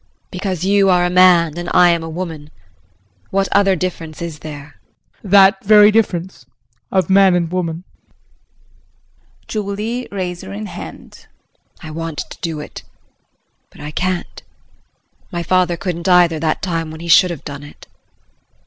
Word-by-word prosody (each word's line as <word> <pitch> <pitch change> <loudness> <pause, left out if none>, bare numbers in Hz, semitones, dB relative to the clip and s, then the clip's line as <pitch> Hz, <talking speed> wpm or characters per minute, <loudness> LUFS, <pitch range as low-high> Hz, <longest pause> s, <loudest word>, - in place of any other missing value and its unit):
JULIE. - - -43
Because 185 -2 -4
you 195 0 +3
are 180 -1 +3
a 180 - -1
man 175 -3 +4
and 175 - -5
I 180 0 +6
am 170 -1 0
a 165 - -6
woman? 160 -3 -6 0.8
What 195 0 0
other 195 -1 +3
difference 165 -3 -5
is 165 -3 -6
there? 145 -1 -10 0.4
JEAN. 200 - -10
That 195 0 +5
very 210 0 +7
difference 180 - -1 0.4
of 190 -4 +1
man 190 -1 +5
and 170 -2 -1
woman. 175 -2 -3 1.6
JULIE 215 +4 -4
[Razor 180 - -5
in 105 +2 -6
hand]. - - -10 0.6
I 155 - -8
want 165 -1 -5
to - - -12
do 165 -3 -3
it 150 - -9 0.9
but - - -19
I 150 0 -7
can't. 185 +2 -3 0.9
My 175 -1 -3
father 180 0 +1
couldn't 170 +2 -4
either 175 -3 +4
that 155 0 -1
time 165 -4 -2
when 160 0 -9
he 170 - -7
should 180 +3 +6
have 170 -4 -7
done 145 -1 -7
it. 145 - -14
175 Hz, 155 wpm, -18 LUFS, 160-190 Hz, 1.6 s, very